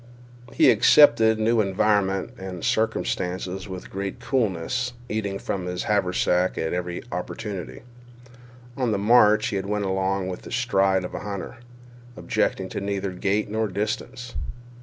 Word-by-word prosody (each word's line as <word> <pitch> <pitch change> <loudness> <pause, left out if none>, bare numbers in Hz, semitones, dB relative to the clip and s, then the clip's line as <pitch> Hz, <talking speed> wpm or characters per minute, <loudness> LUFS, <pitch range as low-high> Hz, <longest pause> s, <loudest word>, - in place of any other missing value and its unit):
He - - +5
accepted 110 -1 +6
new 110 +1 +2
environment 100 -1 +1
and 95 -2 -6
circumstance 95 -4 0
with 95 0 -7
great 95 0 -4
coolness, 125 +1 -1
eating 100 -3 -2
from 95 -2 -4
his 90 0 -3
haversack 90 -2 +1
at 80 - -1
every 90 0 -3
opportunity. 95 +3 -5 0.9
On 125 -4 0
the - - +1
march 110 0 +5
he 100 - -1
went 100 +1 -2
along 95 0 0
with 90 -1 -5
the - - -11
stride 95 -6 +2
of 90 - -6
a - - -4
hunter, 100 +2 -6 0.6
objecting 95 - -1
to - - -4
neither 100 -1 -2
gait 100 +3 0
nor 110 0 0
distance. 115 +5 -4
100 Hz, 140 wpm, -24 LUFS, 95-110 Hz, 0.9 s, accepted